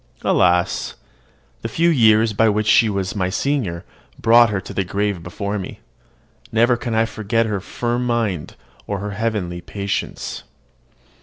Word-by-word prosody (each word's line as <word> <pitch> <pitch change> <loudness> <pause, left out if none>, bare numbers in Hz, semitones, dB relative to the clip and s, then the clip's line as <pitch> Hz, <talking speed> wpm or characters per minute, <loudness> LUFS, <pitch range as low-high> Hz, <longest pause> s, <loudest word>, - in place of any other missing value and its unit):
Alas! 90 -1 +2 0.7
the - - -3
few 170 +8 +2
years 110 -5 +4
by 110 +2 +3
which 105 +1 0
she 110 +1 +5
was 100 -1 -2
my 95 -3 0
senior 105 -7 -1 0.3
brought 115 0 +5
her 100 -2 -1
to - - -9
the 95 - 0
grave 100 0 -2
before 100 +4 -4
me. 95 - -7 0.7
Never 120 +2 +3
can 115 -1 -3
I 115 +1 +3
forget 115 +1 -1
her 105 -3 -2
firm 120 +4 -2
mind 110 -9 -1 0.3
or 100 - -2
her 100 +1 -5
heavenly 100 -5 -2
patience. 100 +1 -4
105 Hz, 150 wpm, -20 LUFS, 100-115 Hz, 0.7 s, she